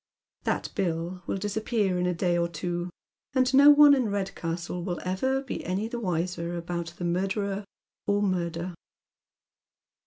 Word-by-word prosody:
That - - -1
bill 175 0 -2
will - - -1
dis 205 +1 -3
appear 215 -4 0
in 180 - +1
a 180 - +1
day 175 0 +1
or 170 0 +2
two, 175 +1 -3 0.5
and 255 0 +3
no 280 +2 +8
one 295 0 +9
in 260 -3 +2
Eedcastle 180 -4 -3
will 175 -1 -3
ever 260 +9 0
be 270 - -5
any 190 +5 -1
the 235 +1 -4
wiser 175 -3 -2
about 170 0 -4
the 175 - -3
murderer 195 +3 -1 0.4
or 205 0 +2
murder. 175 -2 -1
185 Hz, 155 wpm, -27 LUFS, 175-210 Hz, 0.5 s, one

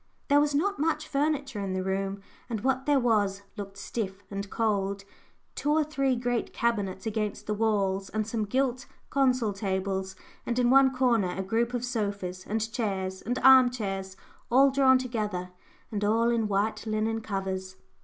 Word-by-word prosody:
There 285 +1 +6
was 290 -1 +1
not 400 +7 0
much 310 0 0
furniture 280 -5 -1
in 195 -2 -2
the 185 0 -1
room, 195 +1 -2 0.3
and 225 -3 -3
what 265 +2 0
there 290 -1 +4
was 205 -5 +1
looked 200 -2 -7
stiff 200 -2 -4
and 200 0 -4
cold: 200 -3 -1 0.5
two 290 - -2
or 310 +1 +4
three 275 -3 0
great 245 -1 -1
cabinets 205 -5 -1
against 215 -2 -2
the 210 - -1
walls, 200 -3 0
and 215 0 -1
some 220 -1 -2
gilt 255 +3 -1 0.2
consol 255 -6 +2
tables, 190 -1 -2 0.3
and 235 - -2
in 245 -1 +3
one 270 0 +6
corner 245 -7 +2
a 190 - -1
group 230 +5 0
of 245 0 -2
sofas, 200 -6 -3
and 220 +1 -2
chairs, 190 -5 -2
and 245 +3 -2
arm 260 -1 +8
chairs 195 -5 -4 0.3
all 270 +3 +5
drawn 265 -1 +5
together, 210 -8 -3 0.4
and 210 -1 -2
all 225 +3 +3
in 230 -2 +1
white 210 +3 -1
linen 220 +1 -1
covers. 190 -2 -4
220 Hz, 170 wpm, -28 LUFS, 195-255 Hz, 0.5 s, arm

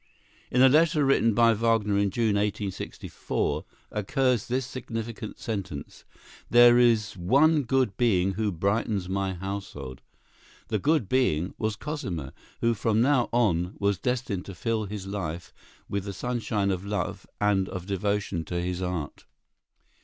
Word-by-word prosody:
In 125 +1 +4
a - - +9
letter 155 +1 +4
written 115 -5 +3
by 115 -1 +5
Wagner 110 -2 +1
in 100 0 +2
June, 110 +1 +1
1864, 100 -6 -2 0.3
occurs 125 +2 0
this 125 +1 -1
significant 115 -3 -6
sentence: 95 -10 -6 0.4
"There 120 0 +7
is 115 -4 +3
one 140 - +4
good 130 -5 +1
being 95 -6 +2
who 105 +1 -1
brightens 100 +2 -1
my 95 0 -1
household." 90 -8 -6 0.7
The 110 -2 0
"good 145 -2 +2
being" 95 -9 +1
was 110 -1 -1
Cosima, 95 - -5 0.3
who 115 0 +3
from 110 0 +1
now 130 0 +3
on 95 -7 +1
was 100 -2 0
destined 125 -5 -2
to 100 - -8
fill 110 +3 -1
his 100 -1 -6
life 90 -4 -5 0.3
with 100 -1 -3
the 100 - -4
sunshine 110 -3 -1
of 95 0 -3
love 100 +1 -3
and 100 -2 +2
of 90 -2 -6
devotion 100 -2 -1
to 85 +2 -3
his 90 +1 -3
art. 90 -5 -4
105 Hz, 145 wpm, -27 LUFS, 95-120 Hz, 0.7 s, a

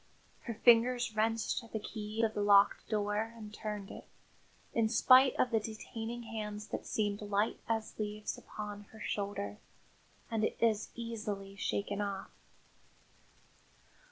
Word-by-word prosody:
Her 235 - -3
fingers 240 0 +4
wrenched 225 +2 +1
at 230 - -15
the 220 - 0
key 215 +1 -4
of 220 -1 +2
the 205 - -1
locked 200 -1 +5
door 210 +1 0
and 215 -2 -9
turned 210 -2 -5
it, - - -10 0.7
in 225 -1 +2
spite 255 +3 +7
of 250 - +2
the 225 - +3
detaining 225 +2 -6
hands 210 -2 -5
that - - -4
seemed 205 -1 0
light 205 +1 0
as 225 -1 -2
leaves 210 0 -3
upon 205 -1 -7
her 220 - -15
shoulder, 200 - -3 0.7
and 220 -1 0 0.2
as 220 -2 +2
easily 210 -4 -4
shaken 200 +1 -1
off. 200 -1 -3
215 Hz, 135 wpm, -33 LUFS, 205-225 Hz, 0.7 s, spite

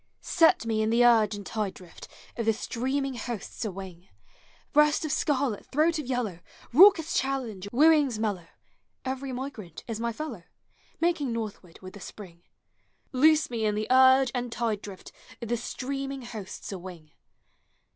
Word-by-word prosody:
Set 325 -8 +4
me 220 -1 0
in 215 - +1
the 235 +2 +4
urge 220 -3 +4
and 205 -1 -8
tide 210 -2 -3
drift 180 -3 -13 0.3
Of 230 -2 -3
the 225 - +5
streaming 265 +5 -2
hosts 235 -3 -6
awing! 190 -3 -7 0.6
Hreast 300 +1 +4
of 305 - -2
scarlet, 280 -8 0
throat 315 +3 +2
of 290 - -6
yellow, 240 -9 -2 0.3
Itaucous 335 +1 +7
challenge, 245 -8 -2
wooings 290 -2 +4
mellow 205 -6 -2 0.3
— - - -48
Every 265 0 -5
migrant 245 - -7
is 225 -2 -4
my 235 0 -1
fellow, 305 +7 -6 0.6
Making 330 -6 +1
northward 210 -6 -6
with 185 - -9
the 205 - -11
spring. 180 -3 -11 0.7
Loose 305 +2 +4
me 230 -2 -2
in 210 -1 +1
the 215 +1 -1
urge 260 0 +6
and 245 -2 -3
tide 225 -4 -1
drift 195 -2 -10 0.3
Of 235 - -7
the 240 - +1
streaming 270 +2 -5
hosts 220 -6 -8
a 195 - -5
wing! 175 -4 -11
235 Hz, 160 wpm, -27 LUFS, 210-275 Hz, 0.7 s, Itaucous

